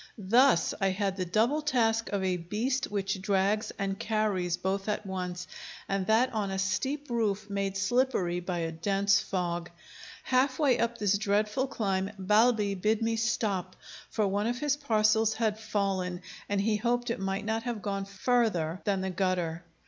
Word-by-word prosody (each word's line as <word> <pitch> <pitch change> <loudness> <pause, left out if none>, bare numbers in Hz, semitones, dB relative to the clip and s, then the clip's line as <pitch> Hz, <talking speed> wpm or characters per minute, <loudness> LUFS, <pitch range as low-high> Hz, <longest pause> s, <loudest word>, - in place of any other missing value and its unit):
Thus 230 0 +4
I 195 - +3
had 195 0 -1
the 185 -1 -2
double 235 - +2
task 230 -6 +1
of 200 -2 -1
a 185 -1 +1
beast 225 +10 -1
which 195 -1 -2
drags 200 +2 +1
and 195 -1 -2
carries 210 -6 0
both 195 +2 -2
at 210 0 -2
once, 180 -1 -4 0.4
and 195 -1 -1
that 240 +4 +3
on 210 -3 -1
a 190 - -3
steep 260 +9 -2
roof, 210 -3 -1
made 195 -1 -1
slippery 200 -5 +1
by 180 0 -3
a 165 - -3
dense 200 +4 +2
fog. 175 -3 -2 0.5
Half 260 +1 +2
way 280 -5 +3
up 235 0 0
this 205 -2 +1
dreadful 210 +5 +1
climb, 195 -6 -1
Balbi 210 +1 +3
bid 215 +4 0
me 225 0 +1
stop, 215 -5 -1 0.3
for 215 - 0
one 205 +3 0
of 240 +1 -1
his 290 +1 +1
parcels 220 -5 +2
had 220 -2 0
fallen, 195 -4 -2 0.3
and 200 -1 +1
he 215 +1 +1
hoped 240 +2 0
it 235 - -3
might 195 +1 -2
not 225 0 -1
have 230 -3 -4
gone 195 -1 -2
further 195 -5 0
than 195 -2 +1
the 190 0 -2
gutter. 175 -3 -1
205 Hz, 170 wpm, -29 LUFS, 190-225 Hz, 0.5 s, Thus